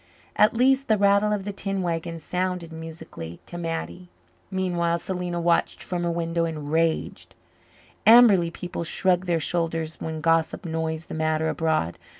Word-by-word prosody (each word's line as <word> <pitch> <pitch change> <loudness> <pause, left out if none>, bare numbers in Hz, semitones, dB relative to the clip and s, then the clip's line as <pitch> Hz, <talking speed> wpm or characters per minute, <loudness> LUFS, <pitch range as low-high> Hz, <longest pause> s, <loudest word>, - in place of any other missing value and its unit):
At 210 +2 +4
least, 265 +3 +3
the 215 - +3
rattle 200 +1 +3
of 205 -2 -1
the 205 - -4
tin 195 -1 -3
wagon 165 -1 -3
sounded 180 0 -3
musically 160 - -8
to - - -10
Mattie. 170 +1 -5 0.4
Meanwhile, 175 -3 0
Selena 175 0 -3
watched 170 0 +1
from 175 -1 -3
her - - +1
window 170 0 -1
and 150 -3 -5
raged. 165 0 -1 0.7
Amberley 220 -7 +7
people 175 0 -5
shrugged 180 +2 +1
their 170 -2 +2
shoulders 165 -1 -2
when 160 -1 -4
gossip 165 +3 +1
noised 160 -1 -3
the - - -7
matter 155 0 0
abroad. 160 - -1
170 Hz, 155 wpm, -25 LUFS, 160-185 Hz, 0.7 s, Amberley